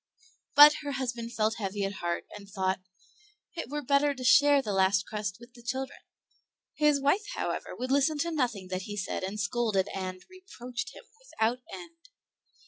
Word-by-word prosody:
But 295 +1 +10
her 290 -1 -4
husband 240 -3 -3
felt 220 +1 0
heavy 200 -1 -3
at 195 0 -4
heart, 170 0 -2
and 200 -1 -11
thought, 190 -1 -1 0.8
"It 330 -7 -5
were 295 +1 -3
better 280 +2 +2
to 255 - -7
share 285 +2 +6
the 215 -7 -2
last 190 0 +3
crust 205 -2 -4
with 240 +1 -15
the 240 - -15
children." 260 +3 -4 0.7
His 300 -2 +3
wife, 290 +10 +2
however, - - -3
would 255 +1 -4
listen 285 +3 +3
to 340 - -1
nothing 235 - -1
that 185 +2 -4
he 205 - -5
said 195 - -3
and 195 +3 -4
scolded 205 -2 0
and, 185 -1 -5
reproached 265 -10 -7
him - - -12 0.2
without 245 - -1
end. 335 -1 -11
240 Hz, 175 wpm, -29 LUFS, 200-285 Hz, 0.8 s, But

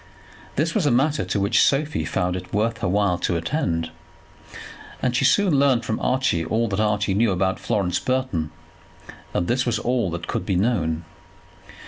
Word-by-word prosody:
This 160 +4 0
was 190 -9 +1
a - - +4
matter 145 +5 +2
to 100 - -1
which 100 +1 +3
Sophie 140 - +1
found 90 +2 -1
it 90 -1 -7
worth 115 +3 0
her 100 - -1
while 95 -2 +1
to 90 - 0
attend, 85 - -2 1.1
and 125 -1 0
she 125 - +2
soon 170 0 +4
learned 135 -4 +3
from 110 - -2
Archie 130 -10 +1
all 115 +7 0
that 100 0 -2
Archie 105 -2 +1
knew 110 +3 +2
about 95 +1 0
Florence 90 -3 0
Burton. 130 -12 -1 0.8
And 85 - -1
this 125 +1 +1
was 120 -2 0
all 120 -4 0
that 85 0 -5
could - - -3
be 95 - -1
known. 90 -6 0
105 Hz, 175 wpm, -23 LUFS, 90-130 Hz, 1.1 s, a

